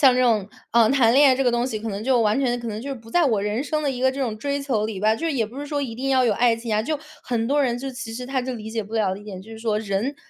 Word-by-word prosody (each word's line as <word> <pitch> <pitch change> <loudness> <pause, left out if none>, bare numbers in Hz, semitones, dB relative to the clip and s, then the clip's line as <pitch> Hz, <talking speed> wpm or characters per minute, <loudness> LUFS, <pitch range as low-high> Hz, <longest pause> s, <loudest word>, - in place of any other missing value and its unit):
像 265 -3 +7
这 255 - +2
种， 215 -5 +2 0.2
呃， 230 0 +5
谈 250 -4 +4
恋 285 0 +7
爱 255 - +3
这 270 - 0
个 245 - +3
东 240 +1 +1
西， 225 -5 -3
可 225 - -5
能 200 0 -4
就 255 -1 +3
完 215 +4 +2
全 245 -2 +1
可 235 - -7
能 215 +1 -5
就 280 - -5
是 270 - -4
不 225 -1 -15
在 350 +3 +3
我 220 -7 +2
人 210 +5 -1
生 305 +1 -1
的 290 - 0
一 250 - -5
个 260 0 +4
这 275 +1 -5
种 225 -5 -1
追 280 +5 -2
求 250 -7 0
里 210 -4 -5
吧， 215 +1 +3
就 330 - -5
是 320 - 0
也 230 -6 0
不 250 +6 -9
是 290 - -4
说 290 0 -2
一 245 -5 -4
定 265 +3 -3
要 260 -1 +4
有 230 - +3
爱 235 +2 +3
情 230 -1 -5
啊。 215 - +2
就 300 +5 -2 0.2
很 230 -2 -1
多 285 +2 +2
人 245 -2 0
就 270 - -5
其 250 -3 -6
实 250 +2 -6
他 260 -1 -1
就 255 0 -3
理 220 -1 -7
解 225 -1 -2
不 210 +2 -10
了 205 -4 +1
的 200 - -9
一 - - -14
点 190 -3 -7
就 220 +3 -12
是 220 - -9
说 220 -2 0
人， 215 +6 -2
240 Hz, 390 characters per minute, -23 LUFS, 220-265 Hz, 0.2 s, 像